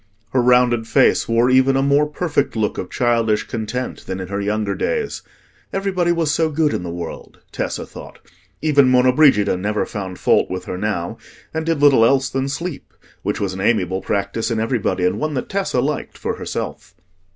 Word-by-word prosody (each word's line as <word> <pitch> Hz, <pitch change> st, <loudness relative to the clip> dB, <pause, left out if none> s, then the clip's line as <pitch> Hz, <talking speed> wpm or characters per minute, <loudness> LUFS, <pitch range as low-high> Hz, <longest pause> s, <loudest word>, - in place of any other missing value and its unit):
Her 130 Hz, -, +2 dB
rounded 120 Hz, -2 st, +3 dB
face 135 Hz, -2 st, +3 dB
wore 115 Hz, +2 st, +3 dB
even 130 Hz, +1 st, +4 dB
a 135 Hz, -, +2 dB
more 140 Hz, +2 st, +3 dB
perfect 150 Hz, -3 st, -1 dB
look 110 Hz, -2 st, -1 dB
of 90 Hz, -, -5 dB
childish 115 Hz, -3 st, +1 dB
content 120 Hz, +3 st, -4 dB
than 95 Hz, 0 st, -4 dB
in 95 Hz, -1 st, -6 dB
her 100 Hz, 0 st, -2 dB
younger 105 Hz, 0 st, -1 dB
days: 455 Hz, -, -2 dB, 0.5 s
everybody 190 Hz, -3 st, 0 dB
was 165 Hz, -3 st, +1 dB
so 160 Hz, +1 st, +1 dB
good 155 Hz, 0 st, +1 dB
in -, -, -2 dB
the 90 Hz, -, -5 dB
world, 85 Hz, -1 st, -7 dB
Tessa -, -, -3 dB
thought; -, -, -11 dB, 0.5 s
even 145 Hz, -4 st, +4 dB
Monna 125 Hz, 0 st, +4 dB
Brigida 130 Hz, -11 st, +4 dB
never 105 Hz, +3 st, -1 dB
found 95 Hz, -3 st, -6 dB
fault -, -, +2 dB
with 90 Hz, 0 st, -5 dB
her -, -, -4 dB
now, 90 Hz, -3 st, -3 dB, 0.3 s
and 160 Hz, 0 st, -3 dB
did 160 Hz, -3 st, 0 dB
little 135 Hz, -5 st, +6 dB
else 135 Hz, +3 st, +3 dB
than 135 Hz, +1 st, -1 dB
sleep, 165 Hz, +3 st, -5 dB, 0.3 s
which -, -, -2 dB
was 100 Hz, -2 st, -2 dB
an 95 Hz, -, -5 dB
amiable 95 Hz, -3 st, +1 dB
practice 100 Hz, +3 st, -2 dB
in 115 Hz, -2 st, -1 dB
everybody, 110 Hz, -5 st, 0 dB
and 90 Hz, -, 0 dB
one 155 Hz, -1 st, -2 dB
that 130 Hz, -, -3 dB
Tessa 195 Hz, -10 st, -1 dB
liked 145 Hz, +3 st, -3 dB
for -, -, -3 dB
herself. -, -, -6 dB
125 Hz, 190 wpm, -20 LUFS, 105-145 Hz, 0.5 s, little